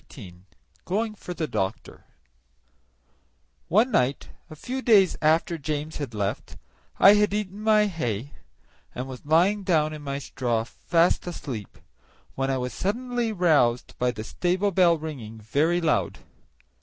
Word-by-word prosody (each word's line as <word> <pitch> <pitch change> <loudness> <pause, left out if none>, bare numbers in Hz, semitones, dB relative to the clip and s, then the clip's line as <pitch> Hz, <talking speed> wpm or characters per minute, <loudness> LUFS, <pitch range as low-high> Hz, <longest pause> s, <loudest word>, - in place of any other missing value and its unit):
18 95 -7 -12 0.4
Going 215 +4 -1
for 180 -4 -8
the 165 - -2
Doctor 95 -8 -4 1.6
One 220 +8 +3
night, 130 - 0 0.2
a 155 - -10
few 255 - -5
days 200 -8 +5
after 160 +2 +2
James 150 +2 -4
had 135 -7 -5
left, 100 -1 -3 0.4
I 200 - +8
had 210 0 +2
eaten 205 -1 -4
my 215 -1 +4
hay 140 - -3 0.6
and 125 +1 -4
was 130 -2 -9
lying 180 +7 +3
down 155 -5 +1
in 155 - -8
my 140 -1 -4
straw 120 -4 -2
fast 170 +9 +1
asleep, 125 - -6 0.6
when 135 0 -2
I 135 - 0
was 125 0 -4
suddenly 240 +3 -2
roused 155 - +2
by 125 - +2
the 110 -3 -5
stable 185 - 0
bell 175 -2 +4
ringing 130 -9 -7
very 150 +11 +1
loud. 165 -3 0
160 Hz, 145 wpm, -25 LUFS, 125-195 Hz, 1.6 s, I